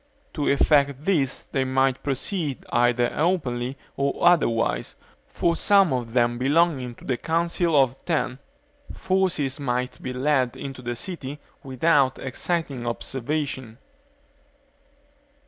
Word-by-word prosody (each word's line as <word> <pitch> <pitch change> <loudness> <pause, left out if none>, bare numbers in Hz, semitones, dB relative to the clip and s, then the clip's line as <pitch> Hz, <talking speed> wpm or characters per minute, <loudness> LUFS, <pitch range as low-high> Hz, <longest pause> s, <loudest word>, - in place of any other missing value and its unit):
To 145 - -2
effect 140 0 +3
this 145 -9 +1
they 135 - -1
might 130 0 +1
proceed 145 +1 -2
either 120 0 +3
openly 135 -6 -1 0.2
or 140 0 -1
otherwise, 135 -10 +2 0.3
for 170 -1 0
some 195 -4 +4
of 120 -3 -3
them 120 -1 +2
belonging 135 -3 +1
to - - -15
the 130 - -1
Council 170 +1 0
of 130 -1 +3
Ten, 150 -6 -1 0.5
forces 180 -7 0
might 125 -2 -2
be 130 - -4
led 130 -1 +1
into 135 -2 -7
the 120 -1 -4
city 145 -2 -5 0.2
without 135 0 +2
exciting 135 -2 -3
observation. 130 -1 -3
135 Hz, 115 wpm, -24 LUFS, 125-160 Hz, 0.5 s, some